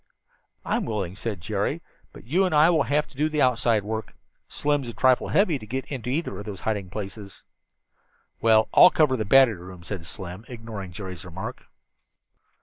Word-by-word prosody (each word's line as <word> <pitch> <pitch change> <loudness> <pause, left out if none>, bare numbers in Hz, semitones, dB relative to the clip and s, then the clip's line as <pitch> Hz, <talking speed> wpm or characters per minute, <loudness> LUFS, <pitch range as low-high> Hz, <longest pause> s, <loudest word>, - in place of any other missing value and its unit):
"I'm - - 0
willing," 100 -5 -3
said 100 -2 -5
Jerry, - - -2 0.3
"but - - -13
you 170 - +1
and 180 -4 +1
I 155 +3 +6
will 160 -3 +3
have 150 +1 +2
to - - -19
do 150 +3 +1
the 155 -1 +1
outside 115 -4 +2
work. 110 +1 -5 0.3
Slim's 145 -3 -1
a - - -7
trifle 130 -1 +3
heavy 180 -8 +2
to 110 - -10
get 130 +3 -3
into 125 -4 -4
either 160 +6 -1
one - - -7
of 105 - -8
those 100 -3 -7
hiding 105 -4 -2
places." 100 0 -8 1.0
"Well, 110 -1 +5
I'll 180 - +9
cover 150 -7 +3
the 110 -4 -2
battery 115 -4 +5
room," 90 -1 -11
said 85 -2 -6
Slim, 90 +4 -7
ignoring 110 -6 -7
Jerry's 90 -2 -7
remark. 95 +8 -7
110 Hz, 185 wpm, -25 LUFS, 100-135 Hz, 1.0 s, I'll